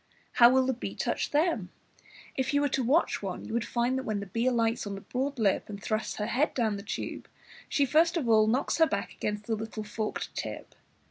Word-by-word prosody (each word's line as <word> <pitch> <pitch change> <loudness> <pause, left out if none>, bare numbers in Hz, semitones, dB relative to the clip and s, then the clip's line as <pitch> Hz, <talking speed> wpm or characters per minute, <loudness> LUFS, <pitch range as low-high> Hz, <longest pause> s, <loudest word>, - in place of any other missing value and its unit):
How 235 -1 +7
will 260 +1 +4
the 265 - +1
bee 245 - -6
touch - - -1
them? 295 - +1 0.7
If 265 +2 0
you 285 - +4
were 290 - +2
to 265 0 0
watch 285 +8 +2
one, 195 -3 -5
you - - -6
would 235 -1 +1
find 245 +3 0
that - - -5
when 215 -4 -2
the 200 - -5
bee 230 +6 -1
alights 230 -3 +1
on 200 - -4
the 195 - -8
broad 270 +5 -3
lip 210 -3 +1
and 200 -1 -6
thrusts 215 +3 -2
her 210 - -2
head 255 +7 +1
down 220 -5 +1
the - - -6
tube, 215 - -5 0.4
she 285 - +2
first 325 +5 +3
of 285 -7 -1
all 215 -1 +5
knows 255 +8 +1
her 320 - +6
back - - -3
against 210 0 -3
the 225 - -1
little 220 0 -5
forked 215 +1 -4
tip. - - -5
235 Hz, 230 wpm, -29 LUFS, 215-265 Hz, 0.7 s, How